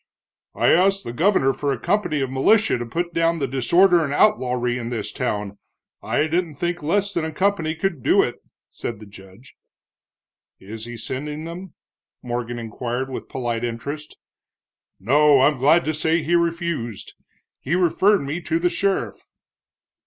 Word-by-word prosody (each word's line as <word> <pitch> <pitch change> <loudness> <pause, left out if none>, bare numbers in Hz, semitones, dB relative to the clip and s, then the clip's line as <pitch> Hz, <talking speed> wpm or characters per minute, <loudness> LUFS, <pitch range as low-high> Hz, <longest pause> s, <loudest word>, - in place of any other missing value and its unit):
"I - - +2
asked 195 +3 +3
the 115 - -6
governor 155 -3 +2
for 145 0 -2
a 135 - -1
company 175 - 0
of 130 -1 -2
militia 210 +12 +3
to 120 - -5
put 170 +6 -3
down 165 0 +1
the 140 -4 -1
disorder 170 +8 +3
and 140 - -3
outlawry 125 - +1
in 115 -1 -5
this 115 -4 -4
town 105 -6 -3 0.4
I 150 - 0
didn't 165 -1 -1
think 175 +3 -2
less 200 +6 0
than 170 - -1
a 160 - -3
company 165 -2 0
could 170 -4 -2
do - - +4
it," - - -4 0.3
said 115 -3 -6
the 110 - -11
judge. 100 +4 -16 1.0
"Is 110 +3 -8
he 120 0 -8
sending 150 +6 -4
them?" 170 +2 -8 0.5
Morgan 120 -1 -4
inquired 120 +3 -4
with - - -7
polite 120 -2 -3
interest. 140 +6 -5 0.8
"No, 145 +6 +4
I'm 145 -1 +3
glad 150 +6 +4
to 155 - 0
say 160 +1 +1
he 165 +4 -1
refused. 170 - -1 0.5
He 160 +6 -1
referred 185 +3 +3
me 145 +5 -4
to 165 -1 -1
the 175 +1 +1
sheriff." 195 -1 -2
150 Hz, 160 wpm, -22 LUFS, 120-170 Hz, 1.0 s, do